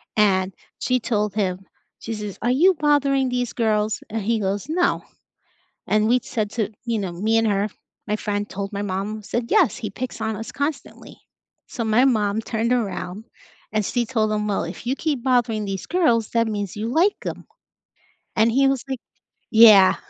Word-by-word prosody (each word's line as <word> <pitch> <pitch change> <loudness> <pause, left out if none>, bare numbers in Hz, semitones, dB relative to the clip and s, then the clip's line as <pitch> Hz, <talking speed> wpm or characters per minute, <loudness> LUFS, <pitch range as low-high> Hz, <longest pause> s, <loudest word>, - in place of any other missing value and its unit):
and 190 -3 +2 0.3
she 255 0 +1
told 210 -3 -1
him, 185 -3 0 0.4
she 225 - -5
says, 210 -2 -6
"Are 240 +2 +1
you 355 +9 +5
bothering 280 -3 +2
these 245 -1 -2
girls?" 215 -2 0
And 220 0 -3
he 225 +1 +1
goes, 200 +4 -2
"No." 355 +2 +1 0.8
And 215 +1 +2
we'd 250 0 +3
said 215 -3 -2
to, 220 -4 -1 0.2
you 230 -2 0
know, 190 -3 -3
me 220 +6 +1
and 225 0 +2
her, 200 0 +1 0.4
my 210 - 0
friend 205 -1 -2
told 200 +1 -5
my 200 - -2
mom, 205 +2 -3
said, 235 +3 -2
"Yes, - - +3
he 215 - -4
picks 245 +3 -6
on 220 0 -2
us 225 +2 -7
constantly." 285 +1 -5 0.5
So 230 -3 -4
my 220 +4 +4
mom 215 -4 +1
turned 230 +2 -1
around 210 -3 -3 0.5
and 215 -2 +1
she 240 -1 0
told 220 -3 0
him, 210 0 -1
"Well, 200 - 0
if 175 +7 -7
you 265 - +1
keep 290 -7 -2
bothering 235 -5 +1
these 195 -2 -4
girls, 240 -12 +2
that 230 -1 +2
means 205 -3 -3
you 215 +2 -3
like 350 +9 +3
'em." - - -5 0.9
And 225 +1 +4
he 270 +2 +4
was 270 -2 0
like 260 -3 -3 0.5
Yeah. 215 -4 +8
220 Hz, 185 wpm, -22 LUFS, 205-245 Hz, 0.9 s, Yeah